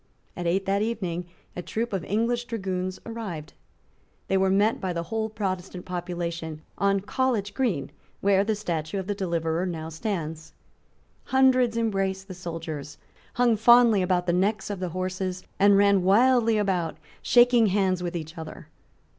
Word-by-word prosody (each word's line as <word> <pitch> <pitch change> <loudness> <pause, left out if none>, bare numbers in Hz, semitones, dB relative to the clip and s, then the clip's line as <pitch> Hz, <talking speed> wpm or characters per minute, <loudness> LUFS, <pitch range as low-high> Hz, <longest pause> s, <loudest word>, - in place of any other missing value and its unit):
At 175 -1 -3
eight 190 +3 +1
that 195 +1 +1
evening 185 -6 -2 0.3
a 180 - -4
troop 225 +5 -3
of 190 -4 -1
English 235 +4 0
dragoons 185 -5 -3
arrived. 205 -10 -6 0.8
They 195 - +2
were 190 0 +3
met 205 +4 +2
by 185 -2 -2
the 170 0 -2
whole 220 +3 -2
Protestant 185 -4 -4
population 170 -3 -4 0.2
on 200 0 +2
College 210 -2 -1
Green, 205 - -1 0.3
where 195 0 +3
the 215 +1 0
statue 170 -4 -3
of 190 - -3
the 205 - -1
deliverer 170 -3 -1
now 160 -2 -4
stands. 160 -3 -4 0.7
Hundreds 255 -3 +3
embraced 195 -4 -1
the 190 - -7
soldiers, 165 -5 -6 0.4
hung 245 -2 +3
fondly 235 -1 +6
about 180 -1 +1
the 175 - +1
necks 200 +3 0
of 200 - -4
the 185 -1 -3
horses, 185 +1 -3 0.2
and 200 0 +6
ran 200 -1 +4
wildly 230 +4 +4
about, 180 -6 0 0.2
shaking 240 -2 +5
hands 190 -2 +1
with 175 0 -3
each 160 0 -6
other. 160 - -9
190 Hz, 155 wpm, -26 LUFS, 175-215 Hz, 0.8 s, fondly